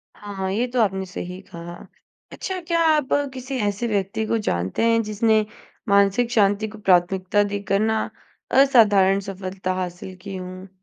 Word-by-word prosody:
हाँ, 195 -2 -5
ये 230 +6 0
तो 245 - +3
आपने 190 -2 0
सही 180 0 -7
कहा। 170 0 -8 0.6
अच्छा 375 -1 -4
क्या 335 -1 +2
आप 300 -3 0 0.3
किसी 260 +1 -5
ऐसे 205 +4 -2
व्यक्ति 205 +1 -1
को 230 - 0
जानते 90 - -1
हैं 230 0 +3
जिसने 215 0 +2 0.4
मानसिक 200 +4 +3
शांति 205 -1 +2
को 215 0 -11
प्राथमिकता 185 +1 +2
देकर 200 -1 0
ना 220 +1 0 0.5
असाधारण 205 -8 +5
सफलता 185 -1 -4
हासिल 180 +1 -6
की 200 -1 -6
हूँ? 185 0 -8
200 Hz, 150 wpm, -23 LUFS, 190-220 Hz, 0.6 s, असाधारण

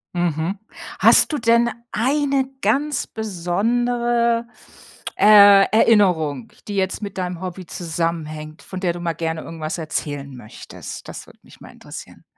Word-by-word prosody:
Mhm. 175 +2 -1 0.4
Hast - - +6
du - - 0
denn 235 0 +3 0.2
eine 275 +2 0
ganz 275 +6 0
besondere, 235 +4 -1 0.7
äh, 200 -1 +7
Erinnerung, 180 - +2 0.2
die 205 - -5
jetzt 190 +1 -1
mit 200 -2 -7
deinem 180 -2 -4
Hobby 185 0 -7
zusammenhängt, 160 -2 -4
von 185 - -8
der 180 -2 -1
du 175 - -8
mal 170 -1 -2
gerne 160 +1 -4
irgendwas 160 -1 -6
erzählen 145 -3 -5
möchtest? 110 -3 -10
Das - - -9
würde - - -19
mich - - -19
mal - - -12
interessieren. - - -12
185 Hz, 135 wpm, -20 LUFS, 165-230 Hz, 0.7 s, äh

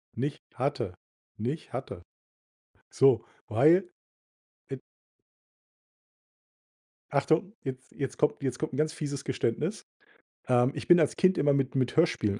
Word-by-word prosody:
Nicht 140 +5 -3
hatte. 120 -8 -2 0.4
Nicht 130 +9 -4
hatte. 100 -8 -6 0.9
So, 130 -4 +4 0.2
weil 165 - +4 0.8
i - - -4 2.3
Achtung, 155 +8 +1
jetzt 130 -1 -7
jetzt 135 -3 -5
kommt 150 - +1
jetzt 130 -2 -2
kommt 155 -4 -3
'n - - -4
ganz 155 +1 +1
fieses 140 -3 -4
Geständnis. 120 -3 -2 0.6
Ähm, 125 +1 +3
ich - - -6
bin 175 -1 +7
als 155 - +2
Kind 185 0 +3
immer 145 0 +3
mit 135 -1 0
mit 130 -2 0
Hörspielen 110 - +2
135 Hz, 125 wpm, -28 LUFS, 125-155 Hz, 2.3 s, bin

